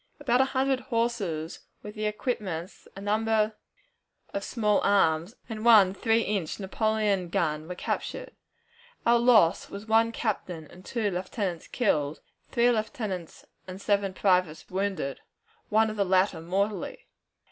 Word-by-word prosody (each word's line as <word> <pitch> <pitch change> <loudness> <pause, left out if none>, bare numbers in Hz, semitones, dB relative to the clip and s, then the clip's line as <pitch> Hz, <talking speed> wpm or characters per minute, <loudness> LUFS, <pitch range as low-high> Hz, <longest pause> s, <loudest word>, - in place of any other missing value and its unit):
About 260 -3 +3
a - - +4
hundred 265 0 +1
horses, 220 -11 -2 0.2
with 210 +1 -8
equipments, 210 -5 -3
a 195 - -8
number 215 +1 +1 0.8
of 200 - -2
small 210 -4 +1
arms, 175 0 +2
and 220 -2 -6
one 210 -5 +7
three 225 +3 +2
inch 200 -7 -2
Napoleon 205 -2 0
gun 160 -4 -1
were 180 - -5
captured. - - -4 0.7
Our 235 0 +5
loss 225 -8 +4
was 200 +2 -8
one 225 +1 +3
captain 185 -8 -3
and 180 +1 -14
two 220 -3 -1
lieutenants 185 -1 -3
killed, 155 - 0 0.3
three 240 0 +3
lieutenants 215 - -4 0.2
and 185 +1 -7
seven 200 -2 0
privates 180 -6 +1
wounded 190 -7 -2 0.5
one 220 +1 +4
of 215 - -8
the 200 - +3
latter 185 -2 +2
mortally. 195 +3 -2
205 Hz, 135 wpm, -27 LUFS, 180-225 Hz, 0.8 s, one